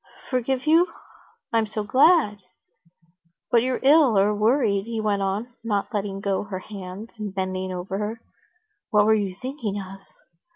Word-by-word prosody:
"Forgive 255 +1 0
you? 330 +3 +4 0.6
I'm 225 -1 +2
so 215 0 -3
glad!" 255 - +4 1.1
"But 235 - +5
you're 255 +1 -1
ill 275 -5 +5
or 200 +2 +4
worried," 210 -2 +2
he 230 -1 -3
went 210 -2 0
on, 205 +5 -2
not 210 -1 -2
letting 200 -1 -3
go 195 -1 0
her 195 -2 -5
hands 195 +2 -8
and 205 -3 -5
bending 185 0 -2
over 185 +2 -4
her. 220 +2 -4 0.7
"What 210 -1 +4
were 220 - +5
you 200 -4 -1
thinking 250 -6 -4
of?" 195 0 -8
210 Hz, 155 wpm, -24 LUFS, 195-240 Hz, 1.1 s, But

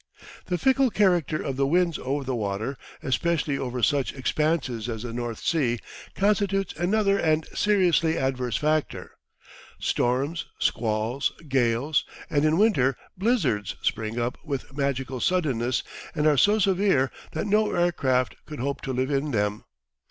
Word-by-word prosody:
The 180 - 0
fickle 265 +3 +3
character 175 - +2
of 135 -2 -3
the 135 0 +2
winds 170 +1 +2
over 140 +2 -2
the 130 0 -3
water, 110 +4 -2 0.3
especially 150 +1 0
over 125 -2 -3
such 140 -3 +2
expanses 130 -4 -1
as 110 -1 -4
the 120 -2 -5
North 120 -2 -3
Sea, 130 -8 +1 0.4
constitutes 195 -1 +1
another 200 +3 +1
and 155 0 +2
seriously 180 -6 +2
adverse 130 -3 -1
factor. 155 0 -1 0.7
Storms, 135 +7 0
squalls, 110 +3 0 0.2
gales, 130 +2 +1 0.3
and, 145 0 +2
in 155 +1 +3
winter, 135 - +3 0.2
blizzards, 180 - 0
spring 110 0 -1
up 120 +1 -2
with 140 -3 -5
magical 135 -2 -2
suddenness, 130 -8 0 0.3
and 150 -1 0
are 150 -1 +5
so 205 +10 +4
severe 190 -9 +2 0.2
that 160 - -2
no 210 +1 +2
aircraft 130 - +1
could 150 -2 -7
hope 140 +3 -2
to 130 - -3
live 130 +3 -1
in 140 +2 0
them. 105 -4 -1
140 Hz, 145 wpm, -26 LUFS, 125-175 Hz, 0.7 s, are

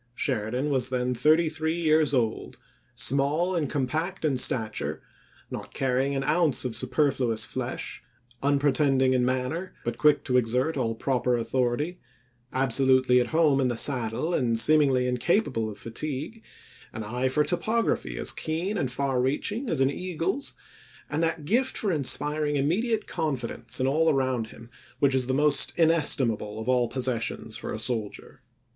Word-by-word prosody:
Sheridan 125 +3 -1
was 130 -3 +1
then 125 0 -1
thirty 155 +7 +3
three 160 +1 -2
years 155 -2 +3
old; 120 -5 -1 0.4
small 140 +8 +1
and 155 -5 -1
compact 155 +7 -2
in 145 -3 +1
stature, 115 -3 0 0.5
not - - -7
carrying 135 +1 0
an 135 - -1
ounce 150 -2 +2
of 120 -3 -1
superfluous 125 -3 +1
flesh; - - -5 0.4
unpretending 140 -2 +2
in 125 -1 +2
manner, 130 +8 -2
but 120 -1 -3
quick 150 -1 +4
to 125 -2 +1
exert 125 +6 +1
all 115 -4 -1
proper 125 0 0
authority; 130 +8 -1 0.5
absolutely 130 -1 +3
at 120 - -1
home 155 -4 +3
in 130 - +2
the 120 -2 -2
saddle 125 +5 0
and 120 -7 +1
seemingly 135 -1 +4
incapable 125 - 0
of 105 - -9
fatigue; 145 - -5 0.5
an 110 - -5
eye 125 +5 -1
for 140 +3 +2
topography 220 +8 -1
as - - 0
keen 175 +6 -3
and 130 -5 -1
far 130 -1 0
reaching 205 - -1
as 150 -5 0
an 135 +1 +3
eagle's; 180 - -3 0.6
and 150 +3 -1
that 165 -2 -1
gift 240 - +1
for 205 - -1
inspiring 150 0 0
immediate 210 - 0
confidence 140 -8 -3
in 130 - +1
all 160 +4 +2
around 130 -5 0
him 115 +1 -13 0.3
which 140 -2 +2
is 130 -2 +1
the - - 0
most 150 0 +4
inestimable 135 -10 +1
of 110 - -6
all 125 -2 +2
possessions 115 -3 -2
for 120 - -4
a - - -3
soldier. 110 -2 -4
135 Hz, 155 wpm, -26 LUFS, 125-155 Hz, 0.6 s, quick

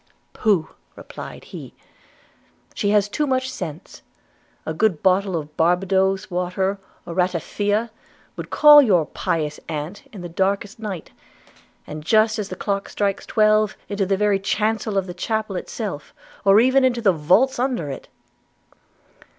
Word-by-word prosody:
'Pooh!' 195 -8 +1 0.3
replied - - -10
he, - - -10 1.0
'she 205 - -1
has 210 -1 +3
too 295 +8 -1
much 260 -1 0
sense. 155 - -8 0.6
A 160 - -3
good 180 -2 0
bottle 190 0 +2
of 150 -2 -5
Barbadoes 190 +3 +1
water, 185 +2 -1 0.3
or 170 - -6
ratafia, 205 +5 -1 0.4
would - - -7
call 295 -1 +8
your 185 - +3
pious 150 -1 -3
aunt 155 +6 -6
in 200 - -9
the 175 - -6
darkest 195 +4 -1
night, 200 -7 -6 0.7
and 150 0 -8
just 220 +4 +3
as 205 -1 -4
the - - -5
clock 200 -1 -3
strikes 200 -1 -2
twelve, 215 -1 +2
into 200 -2 -1
the 195 0 +1
very 205 -1 +2
chancel 215 +1 -1
of 195 - +1
the 180 - -7
chapel 215 +2 -3
itself, 185 -5 -6 0.3
or 195 +1 +7
even 260 +3 +4
into 250 -2 +2
the 195 -4 +4
vaults 185 - +2
under 245 - -1
it.' 135 - -8
195 Hz, 145 wpm, -22 LUFS, 180-215 Hz, 1.0 s, call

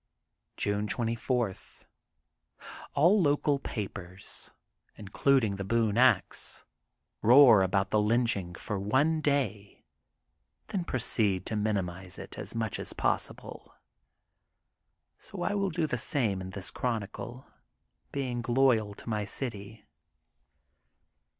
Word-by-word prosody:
June 105 +1 -1
24: 115 +1 0
— 95 - -18
^All 180 +7 +5
local 145 -1 +2
papers, 95 -6 -6 0.5
including 110 +1 +1
The 100 - -4
Boone 110 +1 +1
Ax, 130 +2 +2 0.6
roar 120 -2 +8
about 95 +1 +1
the 105 - +3
lynching 105 -5 +1
for 100 +3 -4
one 145 +11 +1
day, 135 -9 -2 0.8
then 195 -5 -2
proceed 110 - +1
to 110 - -2
minimize 95 -4 -2
it - - -9
as - - -6
much 110 -2 -2
as - - -4
possible. - - -3 1.4
So - - -7
I - - 0
will 200 -1 0
do 165 -1 -1
the 125 -5 -2
same 110 -8 0
in 95 - -6
this 95 -4 -4
chron 115 -4 -1
icle, 120 +5 -9 0.7
being 125 -4 -3
loyal 120 -5 +2
to - - -14
my 105 -2 -1
city. 105 -1 -5
110 Hz, 115 wpm, -29 LUFS, 100-130 Hz, 1.4 s, roar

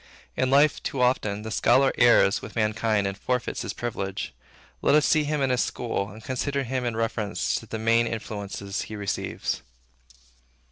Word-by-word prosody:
In 130 - +1
life, 140 +2 +4
too 135 - -4
often, 105 -5 +1
the 110 - -6
scholar 130 +4 +4
errs 120 -4 +5
with - - -9
mankind 110 -1 +1
and 100 0 -2
forfeits 125 +3 -2
his - - -4
privilege. 100 -5 -4 0.5
Let - - +4
us 150 - +4
see 155 -2 +3
him 150 -1 0
in 135 - +2
his 125 - +2
school, 110 -4 -2
and 110 +2 -12
consider 140 +2 -1
him 130 0 -2
in 120 -2 -1
reference 110 -2 -1
to - - -13
the 110 - -4
main 115 +1 +3
influences 100 -3 -4
he 110 - -6
receives. 100 -8 -3
115 Hz, 175 wpm, -26 LUFS, 105-130 Hz, 0.5 s, errs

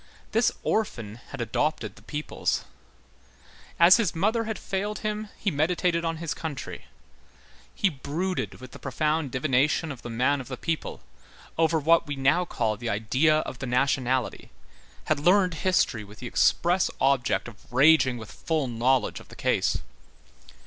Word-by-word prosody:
This 225 +2 +3
orphan 115 - -1
had 140 - -6
adopted 145 +7 -1
the - - -16
peoples. 150 0 -2 1.2
As 170 +4 +8
his 220 -8 0
mother 220 +7 +1
had 220 -1 -3
failed 205 +2 -3
him, 215 0 -2
he 200 - -1
meditated 170 +3 +1
on 165 -1 -1
his 165 -1 -3
country. 155 -5 -6 0.9
He 200 - +2
brooded 165 +5 -3
with 130 0 -12
the - - -11
profound 150 +2 -1
divination 140 +4 +1
of 130 - -9
the - - -7
man 130 +5 +1
of 130 - -11
the 130 - -6
people, 165 +3 -3 0.5
over 165 0 +2
what 165 +2 +3
we 145 - -3
now 140 +7 +2
call 110 -9 -1
the 120 +2 -4
idea 130 +9 +2
of 130 - -7
the 130 - -4
nationality, 130 0 0 0.5
had 155 - 0
learned 180 +3 +4
history 165 - +1
with 105 +1 -14
the 125 - -9
express 175 +8 +2
object 135 -3 +2
of 115 -1 -14
raging 130 -1 +5
with 110 -2 -9
full 160 -3 -1
knowledge 125 +2 +1
of - - -15
the - - -13
case. - - 0
150 Hz, 155 wpm, -26 LUFS, 125-170 Hz, 1.2 s, As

